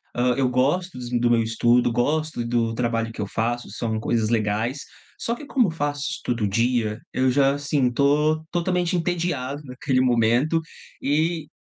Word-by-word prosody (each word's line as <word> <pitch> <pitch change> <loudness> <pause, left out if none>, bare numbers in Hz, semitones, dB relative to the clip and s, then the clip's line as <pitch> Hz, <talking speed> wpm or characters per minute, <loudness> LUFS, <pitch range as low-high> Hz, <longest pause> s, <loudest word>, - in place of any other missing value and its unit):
ah, 125 0 +2
eu 130 -2 +2
gosto 145 +8 0
dos 125 -1 -6
do 120 0 +2
meu 115 -1 +3
estudo, 120 +2 +2
gosto 150 +2 0
do 115 -1 0
trabalho 115 -1 -1
que - - -6
eu 100 - -2
faço, 120 +3 -2
são 110 -2 -2
coisas 110 -1 0
legais, 110 +4 0 0.4
só 235 - -1
que 295 - -10
como 255 -5 +2
eu 165 - -2
faço 145 -2 -2
isso - - -5
todo 115 -4 0
dia, 115 0 0
eu 130 0 +2
já, 135 +1 +3
assim, 145 -3 0
tô 150 +4 +2
totalmente 175 0 0
entediado 165 -5 -2
naquele 130 0 0
momento 125 +5 +2 0.4
e 155 +2 0
125 Hz, 170 wpm, -23 LUFS, 115-150 Hz, 0.4 s, meu